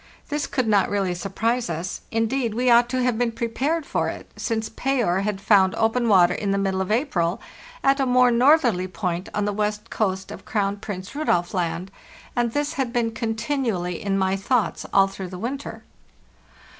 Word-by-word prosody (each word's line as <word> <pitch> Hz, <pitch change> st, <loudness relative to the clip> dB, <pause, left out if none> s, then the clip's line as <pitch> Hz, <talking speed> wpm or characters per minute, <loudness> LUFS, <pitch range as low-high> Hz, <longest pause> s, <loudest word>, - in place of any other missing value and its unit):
This 295 Hz, 0 st, -1 dB
could 255 Hz, -4 st, -1 dB
not 205 Hz, -3 st, +3 dB
really 195 Hz, -3 st, 0 dB
surprise 220 Hz, +5 st, -1 dB
us; 170 Hz, +2 st, -4 dB
indeed, 225 Hz, 0 st, 0 dB
we 250 Hz, +1 st, +2 dB
ought 240 Hz, +1 st, +5 dB
to 255 Hz, 0 st, 0 dB
have 245 Hz, -2 st, +1 dB
been 240 Hz, -1 st, +1 dB
prepared 270 Hz, +8 st, -1 dB
for -, -, -1 dB
it, -, -, -8 dB
since 220 Hz, -2 st, -2 dB
Payer 235 Hz, -8 st, 0 dB
had 200 Hz, 0 st, -2 dB
found 195 Hz, -2 st, +4 dB
open 230 Hz, +1 st, +1 dB
water 180 Hz, -3 st, +5 dB
in 200 Hz, +2 st, -3 dB
the 195 Hz, -, +1 dB
middle 190 Hz, -1 st, 0 dB
of 190 Hz, -, -2 dB
April 195 Hz, -, 0 dB, 0.4 s
at 275 Hz, +1 st, +3 dB
a 270 Hz, -, +1 dB
more 250 Hz, 0 st, +5 dB
northerly 240 Hz, -, +4 dB
point 180 Hz, -1 st, -3 dB
on 210 Hz, -, 0 dB
the 205 Hz, -, -1 dB
west 210 Hz, +1 st, -2 dB
coast 190 Hz, -2 st, -1 dB
of 210 Hz, -, -9 dB
Crown 200 Hz, -2 st, -1 dB
Prince 195 Hz, -2 st, -7 dB
Rudolf 180 Hz, -, 0 dB
Land; 180 Hz, +1 st, -2 dB, 0.4 s
and 240 Hz, -1 st, +1 dB
this 290 Hz, +3 st, -1 dB
had 265 Hz, -3 st, -2 dB
been 235 Hz, -2 st, 0 dB
continually 225 Hz, -, -2 dB
in 195 Hz, -1 st, 0 dB
my 190 Hz, 0 st, +1 dB
thoughts 220 Hz, +4 st, 0 dB
all 195 Hz, -1 st, +5 dB
through 195 Hz, -1 st, -6 dB
the 180 Hz, -, -7 dB
winter. 265 Hz, +8 st, -5 dB
215 Hz, 185 wpm, -23 LUFS, 190-245 Hz, 0.4 s, ought